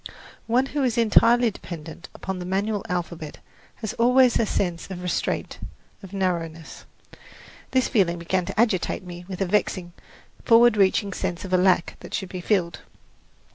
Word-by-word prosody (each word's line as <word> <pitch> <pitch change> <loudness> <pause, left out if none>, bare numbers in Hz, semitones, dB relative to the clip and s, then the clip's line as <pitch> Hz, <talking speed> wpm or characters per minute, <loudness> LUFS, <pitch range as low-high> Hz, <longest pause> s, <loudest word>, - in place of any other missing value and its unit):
One 245 +3 +3
who 285 +1 -3
is 245 -2 0
entirely 235 +1 +4
dependent 170 -2 -9
upon 190 -1 -5
the 180 - -5
manual 200 +2 -1
alphabet 170 -4 -4 0.4
has 220 -1 -5
always 250 +1 +4
a 225 - +1
sense 175 -2 -2
of 180 -1 -7
restraint, 180 - -2 0.4
of 195 -3 -11
narrowness. 170 -5 -3 0.8
This 260 -1 +2
feeling 180 -6 +2
began 175 +2 -1
to - - -5
agitate 215 -4 +1
me 175 -1 -9
with 190 -1 -6
a - - +2
vexing, 185 -2 -1 0.5
forward 235 -1 +6
reaching 200 0 +2
sense 185 -1 -3
of 185 - -6
a - - +6
lack 180 -2 +2
that - - -6
should 190 - -4
be 180 -1 -6
filled. 175 -4 0
190 Hz, 160 wpm, -24 LUFS, 175-220 Hz, 0.8 s, forward